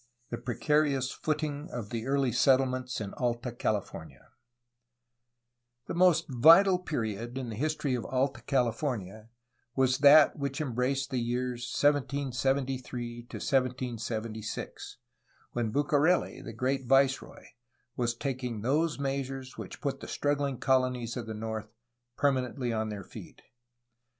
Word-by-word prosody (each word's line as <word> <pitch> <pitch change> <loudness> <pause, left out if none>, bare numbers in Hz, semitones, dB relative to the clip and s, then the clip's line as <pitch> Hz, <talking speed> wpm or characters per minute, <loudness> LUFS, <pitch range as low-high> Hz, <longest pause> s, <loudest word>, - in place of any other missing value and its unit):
CHAPTER 120 - -2
XIX - - -17 0.2
PRECARIOUS 145 -4 +2
FOOTING 150 -1 -3
OF 115 -4 -6
THE 115 0 -3
EARLY 135 -2 +2
SETTLEMENTS 130 0 +2
IN 100 -2 -5
ALTA 120 0 -1
CALIFORNIA 85 - -4 1.6
The - - -5
most 170 -2 +4
vital 170 +8 +6
period 120 - -3
in 130 -3 -4
the 110 - -5
history 150 +1 -1
of 120 -2 -2
Alta 130 +1 -1
California 115 -5 -1 0.5
was 130 -1 +2
that 145 +1 +7
which 140 0 -2
embraced 135 0 -1
the 130 - 0
years 120 +1 -2 0.2
1773 130 -4 0
to - - -6
1776, 115 -4 -3 0.5
when 120 -2 -1
Bucareli, 145 +6 +2
the - - -7
great 130 +3 -1
viceroy, 135 +1 +2 0.5
was 120 -1 0
taking 125 -4 -3
those 150 +7 +1
measures 135 -1 -3
which - - -8
put 135 -2 -2
the - - -8
struggling 145 -2 -1
colonies 130 -3 +1
of 120 -3 -5
the 110 - -5
north 110 0 -4 0.5
permanently 130 -3 0
on 110 -1 -1
their 105 -2 -6
feet. - - -12
130 Hz, 125 wpm, -30 LUFS, 120-140 Hz, 1.6 s, that